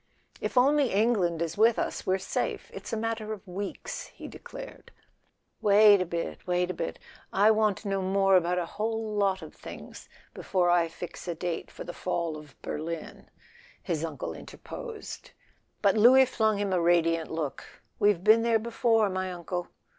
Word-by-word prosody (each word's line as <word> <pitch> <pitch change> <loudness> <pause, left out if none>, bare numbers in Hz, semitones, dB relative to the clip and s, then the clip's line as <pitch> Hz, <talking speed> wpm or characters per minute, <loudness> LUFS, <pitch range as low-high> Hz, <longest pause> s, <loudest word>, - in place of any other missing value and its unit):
"If - - -3
only 280 +1 +4
England 195 -6 +2
is 165 +4 -5
with 225 +1 +5
us - - -3
we're 190 0 +3
safe—it's 190 - -4
a 225 - -1
matter 220 -1 -2
of 210 -1 -11
weeks," 195 +2 -5
he - - -11
declared. - - -10 0.7
"Wait 205 -1 +7
a 185 - -1
bit—wait 180 +1 -2
a - - -5
bit; 80 - -4 0.3
I 205 +3 +5
want 215 -2 +2
to 210 - -8
know 195 -1 0
more 195 +1 +3
about 180 0 +2
a 175 - 0
whole 220 +3 -3
lot 195 -3 +1
of 155 - -10
things - - -11 0.2
before 180 -2 +1
I 175 -1 +3
fix 175 +2 -9
a 170 - -2
date 170 0 -4
for - - -9
the 175 - -7
fall 170 -3 -2
of 150 -2 -13
Berlin," 160 +1 -6 0.5
his 165 -4 -2
uncle 160 -3 -4
interposed; 475 +1 -9 0.5
but 200 0 +4
Louis 255 +5 +7
flung 220 -4 +1
him 200 -1 -1
a 180 - +2
radiant 165 -1 +2
look. 155 -4 -4 0.4
"We've 205 -4 +3
been 220 +2 +6
there 230 -1 +3
before, 225 -1 +2
my 185 -1 -2
uncle!" 175 0 -4
195 Hz, 170 wpm, -28 LUFS, 175-220 Hz, 0.7 s, Wait